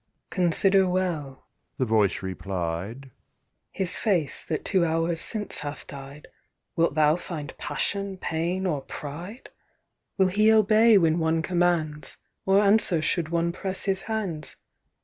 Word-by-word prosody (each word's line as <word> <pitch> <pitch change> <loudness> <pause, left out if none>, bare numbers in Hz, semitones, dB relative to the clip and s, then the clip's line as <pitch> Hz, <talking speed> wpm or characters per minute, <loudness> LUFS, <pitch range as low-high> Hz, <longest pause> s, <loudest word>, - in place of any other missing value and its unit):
"Consider 190 +2 +3
well," 170 -7 -2 0.3
the 130 - +1
voice 105 -5 +1
replied, 95 +6 -4 0.6
"His 185 -2 0
face, 175 - 0
that 155 - -3
two 190 -3 +2
hours 165 0 0
since 215 -2 -2
hath 145 0 -6
died; 140 +1 -10 0.5
Wilt 165 -3 +1
thou 155 0 +4
find 155 -5 -7
passion, 195 +6 -3
pain 175 +2 -2
or 150 -6 -1
pride? 170 - -8 0.7
"Will 190 -2 +4
he 210 +3 +4
obey 220 +1 +6
when 165 -2 +3
one 160 0 +1
commands? 170 -4 0 0.3
Or 195 +2 +5
answer 200 -4 +3
should 160 0 0
one 170 0 0
press 190 +1 -4
his 195 -1 0
hands? 190 -9 -3
170 Hz, 130 wpm, -26 LUFS, 150-190 Hz, 0.7 s, obey